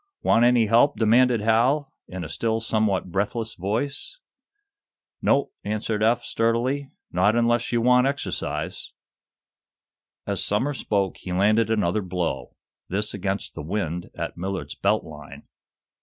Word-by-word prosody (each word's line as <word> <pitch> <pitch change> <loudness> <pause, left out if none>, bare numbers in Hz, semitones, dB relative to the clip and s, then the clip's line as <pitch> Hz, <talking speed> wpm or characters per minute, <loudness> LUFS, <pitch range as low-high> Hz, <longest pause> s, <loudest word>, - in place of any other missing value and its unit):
"Want 115 - +4
any 120 -1 +5
help?" 115 +5 +4
demanded 120 +1 +4
Hal, 125 +6 +2
in 90 -1 -6
a - - -5
still 110 +7 -1
somewhat 110 -5 0
breathless 110 +4 -2
voice. 130 - -3 1.0
"Nope!" 140 - +2
answered 105 +1 -2
Eph, 120 +2 +3
sturdily. 125 +5 0 0.2
"Not 100 +5 +3
unless 120 0 +2
you 120 -1 +1
want 125 +2 +4
exercise." 140 +1 -4 1.3
As - - -2
Somers 130 +7 -1
spoke 100 -3 0
he 90 - -7
landed 105 +4 +3
another 105 -2 +1
blow, 85 -9 -3 0.3
this 105 +3 -1
against 100 0 -3
the - - -6
"wind" 85 0 -3
at - - -4
Millard's 95 +2 -4
belt 105 +2 +1
line. 75 -3 -11
110 Hz, 130 wpm, -24 LUFS, 95-120 Hz, 1.3 s, any